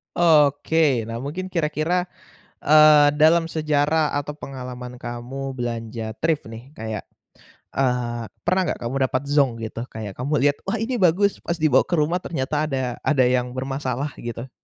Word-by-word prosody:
Oke. 150 -4 +3
Nah 115 0 -5
mungkin 170 +8 -5
kira-kira 165 +2 0 0.5
eee, 150 -1 +7
dalam 165 +2 +4
sejarah 150 0 +1
atau 145 +1 -3
pengalaman 125 -3 -7
kamu 130 +3 -6
belanja 115 -2 -4
thrift 160 -2 0
nih 115 +4 -10
kayak 110 -1 -4 0.8
eee, 125 -3 0 0.2
pernah 185 +2 +1
enggak - - -3
kamu 120 +3 -3
dapat 130 0 -1
zonk 140 -5 +2
gitu, 115 +1 -5
kayak 105 -3 -7
kamu 130 +4 -3
lihat, 145 +1 +3
wah 210 +3 -2
ini 245 +3 -1
bagus, 195 0 +2
pas 170 -1 -3
dibawa 145 -4 +4
ke - - -17
rumah 155 +4 +1
ternyata 150 0 -1
ada 130 -5 -2
ada 140 -4 +3
yang 125 0 0
bermasalah 135 +1 -3
gitu? 120 +2 -6
140 Hz, 150 wpm, -23 LUFS, 125-155 Hz, 0.8 s, eee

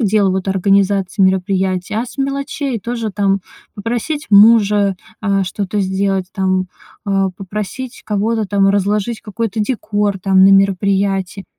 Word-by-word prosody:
дел, 205 -3 +2
вот, 190 +1 -2
организации 195 0 +1
мероприятий, 190 0 0
а 225 +3 -1
с 275 - -13
мелочей 275 -2 -2
тоже: 230 0 -3
там, 195 -1 +1 0.3
попросить 240 +8 -3
мужа, 205 -2 +5 0.3
а, 195 -2 +1
что-то 200 +2 -3
сделать, 190 0 -1
там, 185 -1 0 0.4
а, 195 -1 +1
попросить 210 +6 -6
кого-то 215 +1 -1
там 195 0 +2
разложить 205 +3 0
какой-то 220 0 -3
декор, 210 -4 -1
там, 190 0 +3
на 195 - +7
мероприятии. 195 0 +1
200 Hz, 130 wpm, -17 LUFS, 190-215 Hz, 0.4 s, на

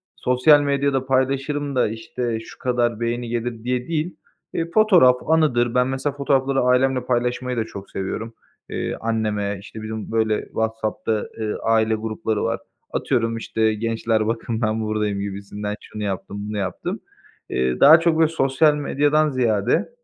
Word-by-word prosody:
"Sosyal 130 +4 +4
medyada 140 -2 0
paylaşırım 135 +2 0
da, 125 - +3
işte, 115 +1 -3
şu 115 - -12
kadar 120 -3 0
beğeni 120 0 -2
gelir." 120 -1 -3
diye 125 0 -1
değil, 165 +1 -2 0.4
eee, 165 0 -2
fotoğraf 185 -13 +6
anıdır. 125 -7 +2
Ben 125 0 +3
mesela 135 +2 -2
fotoğrafları 135 -1 +1
ailemle 125 0 +2
paylaşmayı 125 0 -1
da 110 - 0
çok 100 -3 -10
seviyorum. 110 +4 -4 0.4
Eee, - - -3
anneme, 105 -3 -1
işte, 110 +2 -10
bizim, 110 0 -5
böyle, 110 -1 +1
WhatsApp'ta, 110 -1 -2
eee, 110 -1 -1
aile 110 0 +3
grupları 110 0 -2
var. 115 0 -1 0.3
Atıyorum, 115 -2 0
işte, 110 -1 0
"Gençler 110 0 0
bakın, 115 0 -2
ben 110 0 0
buradayım." 105 -2 -1
gibisinden. 100 +1 -5
"Şunu 105 -1 -7
yaptım, 100 0 -4
bunu 105 - -3
yaptım." 95 -2 -3 0.5
Eee, 65 0 0
daha 155 +4 +9
çok, 165 -1 +2
böyle, 160 -1 +5
sosyal 150 0 +3
medyadan 145 +1 +2
ziyade, 115 -6 +1
120 Hz, 150 wpm, -22 LUFS, 110-135 Hz, 0.5 s, daha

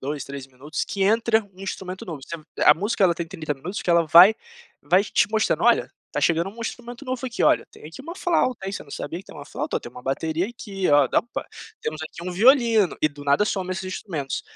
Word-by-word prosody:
2, 140 0 -4
3 140 -1 -7
minutos 135 +4 -5
que 200 - -3
entra 225 +2 +3
um 185 - -16
instrumento 185 -1 -6
novo. 160 -6 -7
Você 170 - -7 0.3
a 150 - +8
música 200 +3 0
ela 175 -2 +4
tem 170 0 -4
30 160 -4 -4
minutos, 180 +10 -6
que - - -8
ela 170 -1 +4
vai 170 +7 +8 0.5
vai 180 +6 +4
te - - +2
mostrando: 220 0 +1
"Olha, - - +4 0.2
tá - - -1
chegando 170 +3 +1
um 230 +3 -13
instrumento 240 +3 -6
novo 255 -1 -4
aqui, 240 - -3
olha, - - +4
tem - - -16
aqui 165 +10 -10
uma 335 +4 -7
flauta, 290 - 0
hein, 195 - -3
você - - -5
não 140 - -18
sabia 155 +4 -5
que - - -19
tem - - -14
uma 145 - -9
flauta, - - -3
ó, - - -3
tem 120 - -9
uma 125 - -12
bateria 160 +6 -1
aqui, 200 -5 -4
ó, 145 -2 +6
dampa, 235 - -1 0.3
temos 155 0 -4
aqui 170 +3 -7
um - - -4
violino", 225 - +4
e 155 - +3
do 145 -1 -12
nada 140 +8 +3
some 190 -3 -2
esses 190 +1 -5
instrumentos. 170 -7 -4
180 Hz, 240 wpm, -24 LUFS, 155-220 Hz, 0.5 s, a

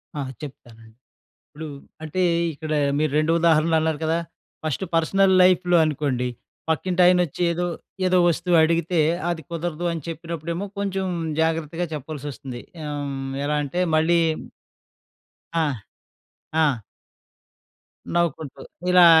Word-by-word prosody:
ఆ! 145 - -2 0.2
చెప్తానండి. 115 -6 -11 0.5
ఇప్పుడు 155 +1 -8 0.4
అంటే, 160 +4 -1 0.3
ఇక్కడ 155 +1 -5 0.3
మీరు 155 -2 +1
2 155 +1 +2
ఉదాహరణలు 160 0 +4
అన్నారు 160 -2 0
కదా! 165 +1 +1 0.5
ఫస్ట్ 155 +4 -1
పర్సనల్ 190 +4 +3
లైఫ్‌లో 180 -1 +4
అనుకోండి, 140 -5 -1 0.4
పక్కింటాయనొచ్చి 180 0 +2
ఏదో, 175 +1 -1 0.4
ఏదో 185 0 +3
వస్తువడిగితే, 170 0 +2 0.3
అది 165 -2 -3
కుదరదు 170 0 -3
అని 165 - -4
చెప్పినప్పుడేమో 165 +2 -4
కొంచుం 195 -1 -1 0.3
జాగ్రత్తగా 165 +1 0
చెప్పాల్సొస్తుంది. 140 -4 -6 0.2
ఆహ్, 145 -1 -3
హ్మ్. 135 0 -4
ఎలా 150 +1 0
అంటే, 150 +6 -3 0.2
మళ్ళీ 170 +2 +3 1.4
ఆ! 160 -2 +2 0.9
ఆ! 145 -8 +2 1.3
నవ్వుకుంటూ. 160 -5 -1 0.3
ఇలా 180 -1 +8
160 Hz, 105 wpm, -23 LUFS, 150-175 Hz, 1.4 s, ఇలా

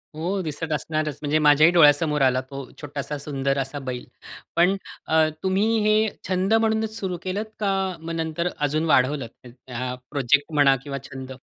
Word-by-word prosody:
हो, 185 +5 -2
दिसत 160 +1 -5
असणारच, 155 0 -2
म्हणजे 150 +1 +1
माझ्याही 150 +2 +6
डोळ्यासमोर 150 -2 +5
आला 130 -1 +3
तो 135 -1 -6 0.2
छोटासा 145 0 -5
सुंदर 140 -1 -2
असा 135 +2 -3
बैल. 125 -1 -4 0.5
पण 180 +3 +4 0.3
अ, 160 0 +4 0.2
तुम्ही 205 +4 +2
हे 215 0 +4 0.3
छंद 190 +3 +1
म्हणूनच 220 -1 +1
सुरु 185 -4 -3
केलंत 195 +4 -2
का 200 -2 +1 0.3
मग 165 +1 -6
नंतर 165 +1 -2
अजून 150 +2 0
वाढवलंत? 135 -4 +2 0.2
म्हणजे 125 +1 -14
हा 125 +1 -3 0.2
प्रोजेक्ट 145 +2 +1
म्हणा 140 -2 +5
किंवा 140 -1 -5
छंद? 130 0 -8
150 Hz, 160 wpm, -24 LUFS, 140-175 Hz, 0.5 s, माझ्याही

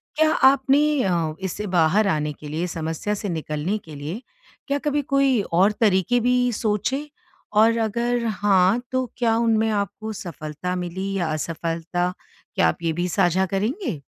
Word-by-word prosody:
क्या 310 0 +3 0.2
आपने 275 +1 +3 0.2
अ, 170 -4 0
इससे 190 +2 -4
बाहर 175 +6 +4
आने 150 -4 0
के 150 - -11
लिए 160 +4 -2
समस्या 165 +4 -3
से 205 0 -4
निकलने 160 +3 -2
के 155 -2 -10
लिए 150 +10 -6 0.5
क्या 280 0 +1
कभी 295 0 0
कोई 275 -4 +2
और 190 +5 +5
तरीक़े 210 +3 +3
भी 250 +1 +2
सोचे? 225 +8 -1 0.4
और 225 +2 +4
अगर 235 +2 0
हाँ, 205 0 +3
तो 260 0 0
क्या 230 -2 +2
उनमें 225 -1 +2
आपको 210 +1 -3
सफलता 170 -1 -5
मिली 185 +2 -4
या 175 -3 0
असफलता? 165 +3 -2 0.4
क्या 80 - +4
आप 80 - -2
ये 165 -1 +1
भी 175 +2 -1
साझा 175 +2 +2
करेंगे? 205 - -2
195 Hz, 155 wpm, -23 LUFS, 170-235 Hz, 0.5 s, और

